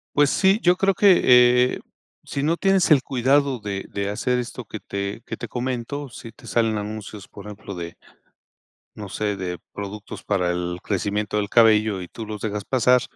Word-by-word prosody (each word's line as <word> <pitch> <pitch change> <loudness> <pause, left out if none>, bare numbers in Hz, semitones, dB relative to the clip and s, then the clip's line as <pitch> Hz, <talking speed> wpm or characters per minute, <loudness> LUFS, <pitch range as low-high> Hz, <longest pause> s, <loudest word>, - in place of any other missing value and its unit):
Pues, 145 -1 +4
sí, 195 +2 +3
yo 180 0 +5
creo 195 0 +2
que, 195 -1 +5 0.5
eh, - - -9 0.4
sino 150 +4 -1
tienes 195 -1 +2
el 140 -4 +6
cuidado 135 +1 +1
de 100 -2 -5
de 100 0 -3
hacer 125 +5 0
esto 125 0 -6
que 110 - -7
te 100 +3 -5
que - - -6
te 120 - -6
comento, 130 +4 -4
si 115 0 -10
te 120 +2 -18
salen 115 0 +1
anuncios, 105 -1 -7
por 100 - -12
ejemplo, 105 -1 -8
de, 85 -1 -7 1.0
no 105 - -8
sé, 105 +1 -2
de 90 -1 -4 0.2
productos 100 +1 -7
para 90 -4 0
el 90 0 -3
crecimiento 105 +1 -1
del 100 -1 -1
cabello 110 -4 +4
y 90 - -7
tú 115 - -8
los 105 -1 -7
dejas 105 -2 -3
pasar, 125 -1 +3
110 Hz, 180 wpm, -23 LUFS, 100-130 Hz, 1.0 s, el